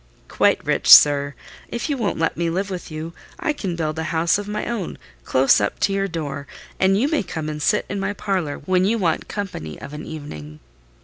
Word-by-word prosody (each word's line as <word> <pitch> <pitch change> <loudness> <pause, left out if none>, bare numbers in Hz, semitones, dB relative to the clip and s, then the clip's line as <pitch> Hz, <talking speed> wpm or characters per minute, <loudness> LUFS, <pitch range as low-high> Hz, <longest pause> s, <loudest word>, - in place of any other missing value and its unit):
"Quite - - +2
rich, - - 0
sir. 145 -1 +8 0.3
If 235 +4 -3
you 290 - 0
won't 225 -6 -1
let 165 - 0
me 170 0 -1
live 195 +4 -2
with 180 -2 -6
you, 160 +1 -6 0.3
I 305 - 0
can 190 - -4
build 160 -1 -2
a 160 - -2
house 170 +3 +2
of 205 - -6
my 210 0 -3
own 230 -7 -4 0.3
close 130 -4 +4
up 100 - -1
to 195 - +2
your 195 0 0
door, 145 -5 -5 0.3
and 190 +1 +3
you 265 - +2
may 310 -1 +1
come 160 -5 -5
and 150 -1 -4
sit 210 - +2
in 200 - -3
my 195 +1 -1
parlour 190 -8 -2
when 185 +1 +2
you 225 +4 +2
want 170 -6 0
company 165 - -5
of 140 - -9
an 150 - -6
evening." 75 - -8
170 Hz, 215 wpm, -22 LUFS, 150-200 Hz, 0.3 s, sir